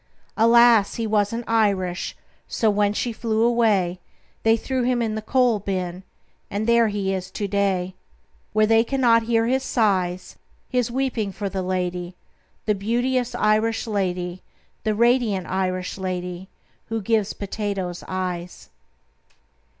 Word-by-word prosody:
Alas, 230 -2 +5
he 230 - -2
wasn't 215 +2 0
Irish. 200 -5 0 0.3
So 220 -2 +1
when 205 0 +2
she 235 +3 -2
flew 220 0 0
away, 215 -7 +2 0.4
They 225 0 +4
threw 260 +3 -2
him 245 0 +1
in 225 -2 -1
the 215 - -3
coal 245 -1 +2
bin 185 -2 -3 0.5
And 205 +2 -2
there 235 0 +4
he 200 -2 -1
is 185 -1 -4
to 205 - -3
day, 190 -2 0 0.6
Where 215 0 +3
they 225 +1 +4
cannot 240 -2 +3
hear 225 0 +1
his 260 +3 +1
sighs 185 -8 0 0.3
His 250 -3 0
weeping 245 -5 -1
for 200 +1 -4
the 190 0 -3
lady, 180 -1 -3 0.5
The 210 - +2
beauteous 245 +5 -1
Irish 215 +1 +1
lady, 180 -4 -2 0.4
The 215 -1 +1
radiant 235 -5 +2
Irish 185 0 -2
lady 180 0 -4 0.4
Who 225 0 -2
gives 215 0 0
potatoes 200 -3 -4
eyes." 180 -1 -5
210 Hz, 135 wpm, -23 LUFS, 185-230 Hz, 0.6 s, Alas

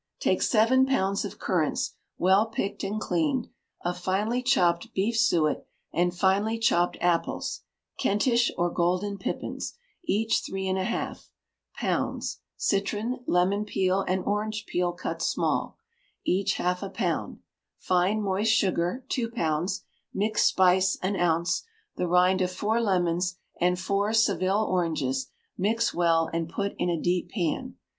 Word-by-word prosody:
Take - - +1
seven 255 +4 +4
pounds 200 -7 +1
of - - -7
currants - - 0 0.2
well 190 +4 +4
picked 205 -2 -3
and 205 +2 -2
cleaned; 280 0 0 0.4
of 175 0 -1
finely 210 +7 0
chopped 225 -5 +2
beef 210 +5 +1
suet, 175 -10 +2 0.3
and 175 +1 +2
finely 195 +5 +1
chopped 200 -7 +2
apples 175 -1 0 0.4
(Kentish 235 +4 +2
or 175 0 +1
golden 185 +3 0
pippins), - - -4 0.3
each 225 - +1
three 190 0 -4
and 190 0 0
a 185 - -1
half; 235 - -4 0.5
pounds; - - -2 0.2
citron, 210 +5 -1
lemon 190 +4 +2
peel, 190 -2 +1
and 185 0 0
orange 215 +2 -2
peel 180 -3 0
cut 175 - -5
small, - - 0 0.5
each 190 +1 +1
half 180 0 -1
a 200 - -4
pound; - - -2 0.4
fine 185 +4 +1
moist 200 +3 +1
sugar, 190 +2 +1
two 235 -3 -1
pounds; 175 -3 -1 0.3
mixed 215 +2 +2
spice, 185 0 +3
an 195 +2 0
ounce; 170 0 +1 0.4
the 180 - 0
rind 180 +2 +4
of 180 0 +1
four 215 +5 0
lemons 180 -3 +1 0.2
and 180 0 +2
four 200 +3 0
Seville 205 -1 +2
oranges; 155 -7 -1 0.3
mix 225 +4 +1
well, 165 -1 +3
and 165 -1 -1
put 200 +3 -2
in - - +1
a 170 -2 0
deep 175 +1 0
pan. 175 -7 -2
190 Hz, 140 wpm, -27 LUFS, 180-215 Hz, 0.5 s, seven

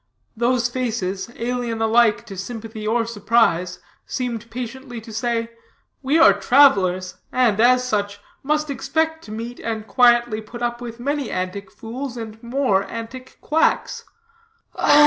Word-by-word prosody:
Those 240 +1 +2
faces, 230 -6 -3
alien 240 -1 -2
alike 225 0 +3
to 200 -4 -9
sympathy 220 +2 -6
or 230 +1 +1
surprise, 205 -5 +1 0.3
seemed 235 -3 -4
patiently 250 +1 -6
to 225 0 -11
say, 230 +1 -1 0.5
"We 280 +3 +2
are 330 0 +8
travelers; 185 -9 +3
and, 235 -5 +2
as 250 +1 +4
such, 205 -2 -1 0.2
must 305 +1 0
expect 320 +3 -1
to 210 - -10
meet, 230 +3 -6
and 220 -1 -4
quietly 240 -1 +4
put 235 +3 -8
up 240 0 -2
with, 235 -1 -7
many 280 0 -2
antic 185 +2 -4
fools, 240 +5 -6
and 220 -1 -7
more 235 -5 +1
antic 235 +3 -8
quacks." 315 +2 +1
235 Hz, 135 wpm, -22 LUFS, 215-250 Hz, 0.5 s, are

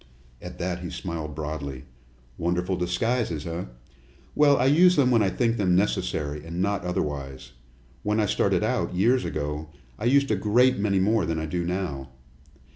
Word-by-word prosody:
At - - -9
that 90 0 -3
he 90 -1 -6
smiled 80 -4 -5
broadly. 70 -3 -5 0.5
"Wonderful 90 +2 -1
disguises, 90 -1 -1
eh? 85 +1 -4 0.7
Well, 145 -2 +5
I 125 - +2
use 175 +6 +5
them 130 -4 +3
when 115 -2 +4
I 100 - +2
think 115 +2 0
them 95 -3 +2
necessary, 75 -6 -1
and 85 +2 -6
not 100 0 0
otherwise. 70 -7 -4 0.5
When 105 +1 0
I 105 - +3
started - - +1
out, - - -1
years 120 +7 +2
ago, 75 +1 -4 0.3
I - - -4
used 140 +1 +3
a - - +3
great 120 +6 +3
many 100 -2 +1
more 110 +4 +2
than 80 - -1
I 80 - -2
do 85 +3 -2
now. 85 -7 -3
90 Hz, 170 wpm, -25 LUFS, 80-110 Hz, 0.7 s, Well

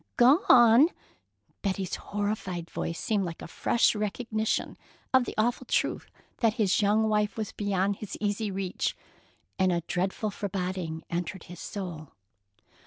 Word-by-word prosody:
"Gone!" 245 - +7 0.7
Betty's 190 -2 -2
horrified 200 -4 -3
voice 165 - -3
seemed 210 -3 0
like 170 -2 -6
a - - -6
fresh 235 - +2
recognition 215 +1 -1 0.4
of 260 -1 +5
the - - -6
awful 240 +3 0
truth - - 0 0.3
that 225 -2 +2
his 210 -4 +2
young 210 +2 +3
wife 210 0 +1
was 215 -2 -3
beyond 200 -1 0
his 215 - -7
easy 205 +1 -1
reach, 190 -1 -2 0.6
and 185 -1 +4
a 170 -1 +1
dreadful 190 +5 -2
foreboding 185 -5 -3
entered 175 +1 -3
his 175 -1 -11
soul. 170 -7 -6
205 Hz, 135 wpm, -28 LUFS, 185-220 Hz, 0.7 s, Gone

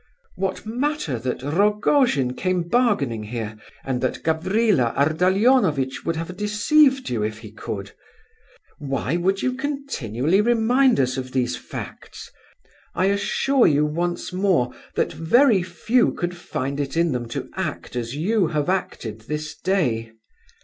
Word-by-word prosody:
What 190 +2 -3
matter 245 - -2
that 125 +1 -3
Rogojin 205 - +2
came 185 +3 -1
bargaining 170 - +1
here, 110 0 -5 0.3
and 130 -2 -2
that 130 - -2
Gavrila 165 - +1
Ardalionovitch 180 - +2
would 165 - -1
have 165 +3 -5
deceived 260 - +3
you 115 -3 -1
if 105 0 -2
he 110 -2 -11
could? 100 -2 -6 0.9
Why 135 +1 -2
do 185 +2 +2
you 255 - 0
continually 210 - -1
remind 240 - +3
us 130 0 +1
of 130 -1 -5
these 125 -2 0
facts? - - -9 0.6
I 190 +2 +2
assure 255 +6 +2
you 150 0 +3
once 175 +4 -2
more 180 -10 +2 0.2
that - - 0
very 220 - +4
few 185 +8 +1
could 175 0 -3
find 145 -5 -4
it 140 +2 -3
in 170 -1 +3
them 120 -2 -3
to - - -5
act - - -4
as 120 +1 -3
you 190 +4 +1
have 155 0 -1
acted 115 - -3
this 150 0 -4
day. 120 - -1
170 Hz, 140 wpm, -23 LUFS, 130-210 Hz, 0.9 s, very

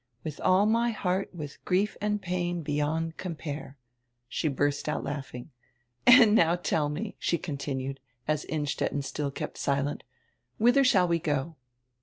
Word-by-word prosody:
'With 155 -2 -6
all 185 +2 +4
my 230 +2 +3
heart, 195 -3 -1
with 150 -5 -8
grief 195 +3 +1
and 210 0 0
pain, 175 -2 -2
beyond 155 +2 -1
compare.'" 150 -5 -6 0.5
She 155 - -1
burst 145 +1 0
out 150 - -2
laughing. 135 -1 -6 0.6
"And 245 -4 +9
now 170 -5 +5
tell 160 -4 0
me," 150 +3 -4
she 170 - +1
continued, 135 -4 -4 0.3
as 155 -1 0
Innstetten 145 -2 -2
still 145 +1 -3
kept 135 - -6
silent, 140 +1 0 0.6
"whither 245 +5 +5
shall 195 -9 +4
we 170 -1 +1
go?" 150 +1 -2
160 Hz, 145 wpm, -28 LUFS, 145-185 Hz, 0.6 s, And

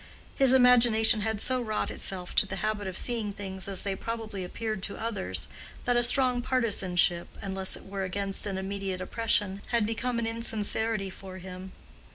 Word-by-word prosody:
His 270 -3 +6
imagination 235 -3 +5
had 220 0 -1
so 255 +3 +2
wrought 215 -3 -2
itself 180 -2 -3
to 205 - +5
the 190 - -4
habit 210 -2 -1
of 185 -1 -4
seeing 230 -4 0
things 190 -1 -5
as 195 -2 -3
they 195 -1 -2
probably 220 -2 -5
appeared 215 +2 -4
to 200 - -4
others, 95 - -3 0.4
that 245 - +2
a 240 - +4
strong 250 0 +3
partisanship, 195 -9 +2
unless 190 -1 -1
it - - -12
were 195 0 -5
against 195 +2 0
an 195 -2 -3
immediate 190 -1 -3
oppression, 200 0 +2
had 235 -3 +2
become 230 +2 -2
an 235 - -1
insincerity 225 -2 -1
for 185 0 -10
him. 185 +1 -9
205 Hz, 175 wpm, -28 LUFS, 190-230 Hz, 0.4 s, His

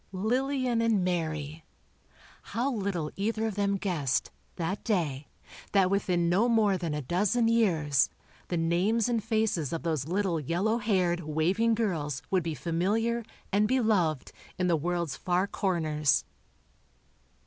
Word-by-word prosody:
Lillian 250 +4 0
and 225 -5 +2
Mary! 160 -3 -2 0.9
How 255 +4 +1
little 195 - -2
either 220 +2 -1
of 220 - -1
them 200 0 0
guessed, 170 -10 -1 0.2
that 185 +4 -3
day, 155 - -1 0.5
that 195 -2 +4
within 180 -3 +1
no 200 +8 +3
more 215 -4 +3
than 170 -4 -3
a 150 - -3
dozen 205 - +1
years, 165 - +3 0.4
the 175 - -1
names 180 +8 +1
and 230 -3 0
faces 220 - 0
of 165 - -3
those 155 -5 -1
little 185 -2 0
yellow 185 - 0
haired, 185 -6 +1
waving 175 +9 +1
girls 150 - -2
would 190 -1 +3
be 165 -1 -3
familiar, 210 +9 0 0.3
and 205 +2 +3
beloved, 205 - +1 0.3
in 185 - 0
the 175 -2 +3
world's 170 -1 -2
far 180 +1 +1
corners. 155 -8 0
185 Hz, 135 wpm, -29 LUFS, 165-220 Hz, 0.9 s, that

